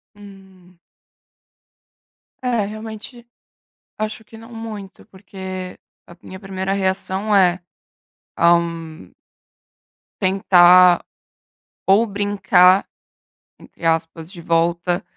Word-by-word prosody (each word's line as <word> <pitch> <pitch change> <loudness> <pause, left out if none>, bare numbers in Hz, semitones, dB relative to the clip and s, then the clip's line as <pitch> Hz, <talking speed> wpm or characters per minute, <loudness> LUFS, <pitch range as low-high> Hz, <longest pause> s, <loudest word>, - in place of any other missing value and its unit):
Hum. 190 -3 -17 1.6
É, 235 -5 0
realmente, 220 +3 -9 0.7
acho 215 +1 -4
que 220 +1 -15
não 230 +1 -14
muito. 215 -4 -9
Porque 190 -1 -9 0.3
a 170 - -14
minha 190 0 -11
primeira 195 -1 -4
reação 195 +1 -1
é, 185 -2 +3 0.8
ah 170 0 +5
hum 165 -1 -5 1.1
tentar 180 -2 +5 0.8
ou 205 +4 +3
brincar, 200 -2 +3 0.7
entre 170 - -13
aspas, 165 +1 -2
de 175 -4 -11
volta, 170 +1 0
190 Hz, 85 wpm, -19 LUFS, 175-205 Hz, 1.6 s, ah